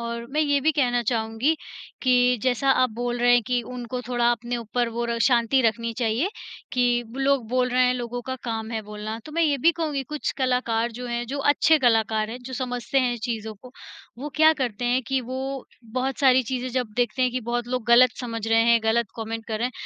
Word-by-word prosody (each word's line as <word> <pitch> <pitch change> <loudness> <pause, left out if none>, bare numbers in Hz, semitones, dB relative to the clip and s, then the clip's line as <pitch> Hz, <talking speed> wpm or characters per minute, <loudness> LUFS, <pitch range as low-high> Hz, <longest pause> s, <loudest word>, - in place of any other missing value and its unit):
और 235 0 -5
मैं 300 +2 0
ये 285 -2 +2
भी 315 +3 +2
कहना 245 -4 +1
चाहूँगी 225 +5 0 0.5
कि 250 -1 +3
जैसा 260 +1 +2
आप 255 -2 +3
बोल 240 +2 -3
रहे 245 0 +5
हैं, 245 -1 +5
कि 245 +1 0
उनको 250 +1 -6
थोड़ा 240 -1 +2
अपने 240 +1 -3
ऊपर 240 +1 -2
वो 235 +1 -3
र 235 0 -2
शांति 240 +1 +3
रखनी 230 0 0
चाहिए 235 - 0 0.4
कि 245 -1 +2
लोग 270 -3 +1
बोल 250 +1 +1
रहे 250 +1 +3
हैं, 250 - +2
लोगों 245 0 -4
का 260 +1 -4
काम 225 -1 -3
है 225 -1 -2
बोलना। 210 +1 -6
तो 305 - -10
मैं 335 +2 +1
ये 295 -3 +2
भी 335 +6 +4
कहूँगी 310 -5 -2
कुछ 300 +2 -3
कलाकार 250 -3 0
जो 250 +2 -7
हैं, 240 0 -2
जो 280 +3 -4
अच्छे 295 +2 +4
कलाकार 220 -3 +2
हैं, 245 - -6
जो 260 - -8
समझते 245 0 -2
हैं 250 -2 +1
चीज़ों 220 -3 -4
को, 250 +5 -15 0.5
वो 285 +4 -5
क्या 315 +1 +6
करते 245 -3 -2
हैं 245 +2 +1
कि 270 -1 0
वो 260 +2 -5 0.3
बहुत 260 +1 -2
सारी 260 -2 +5
चीज़ें 255 +1 -3
जब 245 -4 -2
देखते 245 +1 0
हैं 255 - +2
कि 255 +1 -3
बहुत 240 0 -1
लोग 250 -2 -2
गलत 245 +1 +7
समझ 230 -3 -4
रहे 225 0 +4
हैं, 235 0 +4
गलत 225 +1 +2
कॉमेंट 225 0 -5
कर 220 -1 -2
रहे 235 - 0
हैं, 255 - -6
245 Hz, 225 wpm, -24 LUFS, 230-260 Hz, 0.5 s, गलत